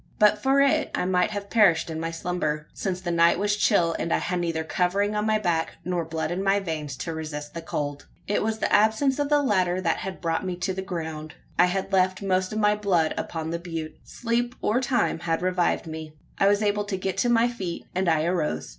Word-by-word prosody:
But 210 0 +4
for 270 +3 +3
it, 280 -1 +3
I - - -1
might 180 0 +2
have 205 -1 -6
perished 180 -8 +4
in 160 - -4
my 165 0 -2
slumber: 165 -3 -2
since 185 -2 -3
the 175 -1 -3
night 170 0 +4
was 205 +2 +1
chill, 175 -6 +2
and 165 - -2
I - - +3
had 180 -3 -2
neither 165 -2 -1
covering 190 +5 0
on 210 +1 0
my 215 0 +3
back, 170 -6 0
nor 175 -1 -1
blood 160 0 -3
in 185 +2 -2
my 195 +1 +3
veins, 155 -7 -4
to 165 +7 -4
resist 150 -2 -6
the 170 - -5
cold. 145 -3 -4 0.2
It 205 - +1
was 220 +1 -1
the - - -1
absence 220 +7 +3
of 290 -1 0
the 295 -1 +3
latter 185 -7 +2
that 170 -3 0
had 190 -1 -6
brought 165 0 -1
me 185 -1 -3
to 185 +2 -2
the 190 - -4
ground. 160 -4 -5 0.2
I 180 - +8
had 195 +2 -3
left 185 +1 +2
most 185 -1 +1
of 215 - -3
my 210 -1 +3
blood 185 -6 +1
upon 160 -1 -4
the 170 - -2
butte. 165 -2 -6
Sleep 240 +1 -2
or 235 +4 +1
time 250 -9 +1
had 165 0 -1
revived 180 -1 +1
me. 160 -1 -7 0.3
I 195 - +4
was 205 +1 +3
able 205 0 +1
to 200 -2 -3
get 190 0 -2
to 245 - +2
my 235 0 +4
feet; 190 -8 -5
and 185 -1 +1
I 160 -1 +2
arose. 80 - -1
185 Hz, 235 wpm, -25 LUFS, 165-205 Hz, 0.3 s, I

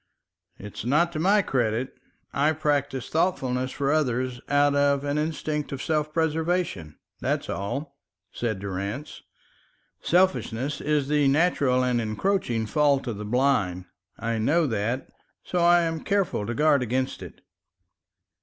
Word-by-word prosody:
"It's 105 0 -8
not 150 +8 +2
to 155 - -4
my 200 +5 +4
credit. 125 -3 -1 0.4
I 150 +3 +2
practise 145 -4 -1
thoughtfulness 130 -7 0
for 140 0 -1
others 130 -4 0
out 145 0 +3
of 140 0 +2
an 145 +1 -1
instinct 150 -1 -2
of 140 - -4
self 155 0 -1
preservation, 160 - -1 0.2
that's - - -1
all," 140 - -4 0.3
said 115 -4 -2
Durrance. 100 +8 -5 0.8
"Selfishness 150 -7 +1
is 150 -2 0
the 145 -1 +2
natural 140 -4 +2
and 125 -2 +1
encroaching 115 - -1
fault 140 +3 +2
of 115 -5 -4
the 105 - -6
blind. 105 -7 +1 0.3
I 115 -1 -2
know 160 +9 +2
that, 115 +1 -2 0.4
so 180 - -2
I 175 0 +5
am 165 -1 -2
careful 195 - 0
to 120 - -3
guard 150 0 +3
against 130 +2 -2
it." - - -10
140 Hz, 135 wpm, -25 LUFS, 120-155 Hz, 0.8 s, I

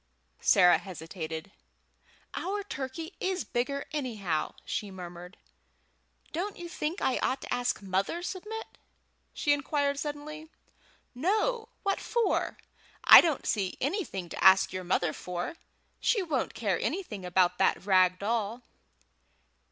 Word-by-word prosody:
Sarah 180 -2 +6
hesitated. 165 -1 -6 0.8
"Our 405 +3 -2
turkey 320 +1 -5
is 370 -1 -1
bigger 280 +4 -2
anyhow," 215 - -2
she 205 - -3
murmured. 180 0 -9 1.0
"Don't 380 +6 -3
you 345 - -6
think 335 +1 -3
I 260 - +2
ought 260 0 0
to - - -3
ask 245 -3 -1
mother, 195 - -1
Submit?" 425 +5 -6 0.5
she 290 - +2
inquired 285 0 0
suddenly. 305 +1 -6 0.6
"No! 430 - 0
What 395 -1 +1
for? 475 -1 0 0.5
I - - +11
don't 320 -6 -1
see 195 -4 -1
anything 275 - -2
to - - -5
ask 190 0 +7
your 185 0 -3
mother 175 -2 +1
for. 180 - -5 0.4
She 425 -5 +2
won't 300 -7 -1
care 200 -6 0
anything 300 - -3
about 180 0 +2
that - - +2
rag 185 -2 +4
doll." 225 +3 -2
250 Hz, 125 wpm, -29 LUFS, -, 1.0 s, I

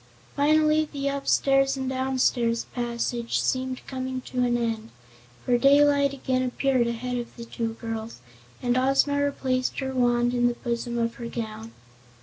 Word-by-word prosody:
Finally 305 +1 +3
the 280 -1 -3
upstairs 275 -1 +2
and 265 -1 -3
downstairs 255 -3 +1
passage 235 -1 -2
seemed 255 0 -2
coming 260 -1 -4
to 255 0 -6
an 240 -1 +2
end, 225 -1 -2 0.6
for 245 -1 +3
daylight 280 +1 +5
again 260 -1 -1
appeared 255 -1 +1
ahead 245 +2 -3
of 240 -1 -6
the 235 - -8
two 230 -1 -3
girls 225 - -6 0.4
and 245 +1 +2
Ozma 275 +2 +2
replaced 260 -3 -1
her 265 -1 -3
wand 240 -1 +2
in 245 0 +3
the 240 - -1
bosom 240 -1 -3
of 230 0 0
her 235 - -5
gown. 225 -1 -6
255 Hz, 150 wpm, -26 LUFS, 235-270 Hz, 0.6 s, daylight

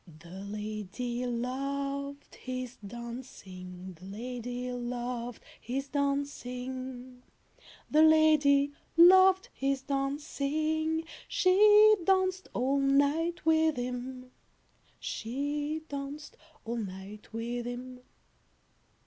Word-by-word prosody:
The 170 +2 -14
lady 215 +5 -4
loved 275 +3 -3
his 255 -1 -6
dancing, 195 -5 -9
The 185 - -12
lady 245 +3 -5
loved 245 -1 -4 0.2
his 270 +3 -3
dancing, 260 -3 -3 0.7
The 305 - +4
lady 305 -3 +5 0.2
loved 375 +2 +7
his 270 0 -1
dancing, 305 +3 -1 0.2
She 420 +3 +6
danced 375 0 +2
all 270 +3 +2
night 285 +5 +2
with 320 -2 +3
him, 250 +1 -5 0.7
She 290 +6 -3
danced 285 +1 -6 0.3
all 235 +1 -3
night 200 0 -7
with 235 +1 -3
him. 250 +1 -6
260 Hz, 85 wpm, -30 LUFS, 240-295 Hz, 0.7 s, loved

